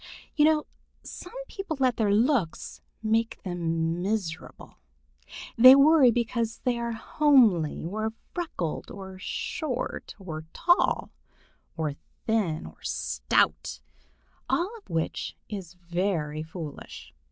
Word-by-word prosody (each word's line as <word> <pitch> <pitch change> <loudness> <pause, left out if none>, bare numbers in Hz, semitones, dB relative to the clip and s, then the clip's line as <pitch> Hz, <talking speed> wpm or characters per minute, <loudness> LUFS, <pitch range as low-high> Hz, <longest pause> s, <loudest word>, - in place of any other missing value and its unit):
You 295 - +5
know 310 -1 +3 0.4
some - - -9
people 390 -6 -5
let 255 -2 +2
their 210 -3 +2
looks 220 - +1 0.2
make 225 +1 +1
them 165 -2 -1
miserable. 190 -5 -4 0.8
They 255 +3 +11
worry 280 -1 +7
because 230 -1 -1
they 245 -2 +1
are 235 0 -2
homely 225 - +3
or 215 +5 -2 0.2
freckled, 310 - -3
or 190 -1 -9
short 255 - -4
or 160 -6 -7
tall, 350 +1 +2 0.7
or 155 -3 -1 0.3
thin 205 -9 0
or - - -13
stout, - - 0 0.7
all 375 +7 0
of - - -30
which 165 -1 -2
is 185 -4 -7
very 170 -3 -2
foolish. 160 -1 -8
215 Hz, 110 wpm, -27 LUFS, 170-255 Hz, 0.8 s, They